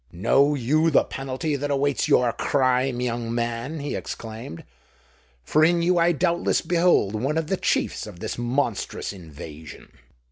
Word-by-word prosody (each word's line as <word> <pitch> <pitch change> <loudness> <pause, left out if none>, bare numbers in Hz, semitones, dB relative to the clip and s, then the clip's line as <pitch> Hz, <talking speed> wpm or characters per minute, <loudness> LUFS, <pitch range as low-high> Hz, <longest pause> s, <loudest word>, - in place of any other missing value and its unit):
"Know 140 +12 +3
you 150 +6 +2
the 150 - +4
penalty 135 +3 -3
that 145 +1 -3
awaits 140 -1 +1
your 120 -2 +3
crime, 130 -2 +1
young 120 -1 -2
man?" 120 +6 -3
he 145 - -4
exclaimed; 110 -7 -7 0.8
"for 155 - +2
in 170 +1 +3
you 175 0 +3
I 170 +1 +4
doubtless 170 +1 +1
behold 170 - +2
one 135 +8 -1
of 160 - 0
the 190 +5 -1
chiefs - - -1
of 85 - -11
this - - -4
monstrous 120 -4 -2
invasion." 80 -3 -11
135 Hz, 150 wpm, -24 LUFS, 115-155 Hz, 0.8 s, the